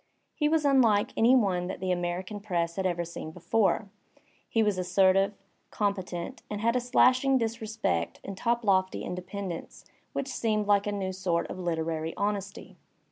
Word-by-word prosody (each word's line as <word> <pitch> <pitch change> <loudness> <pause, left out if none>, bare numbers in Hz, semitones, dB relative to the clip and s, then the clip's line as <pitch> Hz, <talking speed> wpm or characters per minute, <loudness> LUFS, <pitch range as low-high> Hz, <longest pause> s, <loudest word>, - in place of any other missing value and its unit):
He 300 -1 +1
was 315 -1 +2
unlike 235 -7 +4
any 240 +3 +5
one 185 -7 +2
that 190 - -5
the 185 0 -1
American 180 +3 -2
press 170 -5 -2
had 190 -1 0
ever 175 -1 -1
seen 165 -1 -7
before; 185 +5 +1 0.6
he 225 - +2
was 205 -3 +1
assertive, 190 +2 +3 0.4
competent^ 190 -4 -2
and 210 - -4
had 230 +2 +1
a - - +3
slashing 255 +2 +4
disrespect 220 - -2
and 195 - -6
toplofty 200 -4 +1
independence 180 0 -6 0.3
which 275 - -2
seemed 215 -4 0
like 205 0 +3
a - - 0
new 195 -2 -2
sort 180 -3 0
of 185 - -7
literary 160 -2 -2
honesty. 200 -1 -3
195 Hz, 155 wpm, -28 LUFS, 180-220 Hz, 0.6 s, any